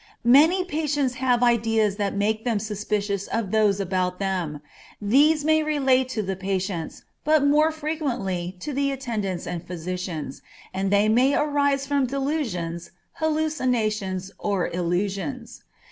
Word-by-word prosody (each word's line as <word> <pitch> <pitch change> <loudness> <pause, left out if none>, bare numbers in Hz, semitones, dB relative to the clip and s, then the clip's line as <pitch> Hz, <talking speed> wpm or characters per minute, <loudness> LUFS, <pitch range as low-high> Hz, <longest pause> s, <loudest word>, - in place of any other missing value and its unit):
Many 315 +10 +6
patients 295 -6 -1
have 250 -2 +2
ideas 225 -3 +2
that 200 -2 -1
make 215 +2 0
them 235 -3 0
suspicious 205 -1 -2
of 220 -4 -2
those 210 -2 +3
about 185 -1 -1
them; 180 -7 -2 0.4
these 290 +8 +3
may 315 0 +4
relate 270 -4 +2
to 220 -4 -2
the 190 0 -2
patients, 190 -3 -3 0.2
but 305 -1 +3
more 300 +2 +4
frequently 250 - -3
to 295 - -4
the 280 +1 +1
attendants 215 -9 -3
and 175 -2 -4
physicians, 175 -4 -5 0.3
and 190 +1 -1
they 205 +1 +3
may 250 +6 +4
arise 285 -2 +1
from 280 -2 +1
delusions, 245 - -3 0.3
hallucinations 240 - -1
or 200 -4 -1
illusions. 195 +8 -3
220 Hz, 130 wpm, -24 LUFS, 190-280 Hz, 0.4 s, Many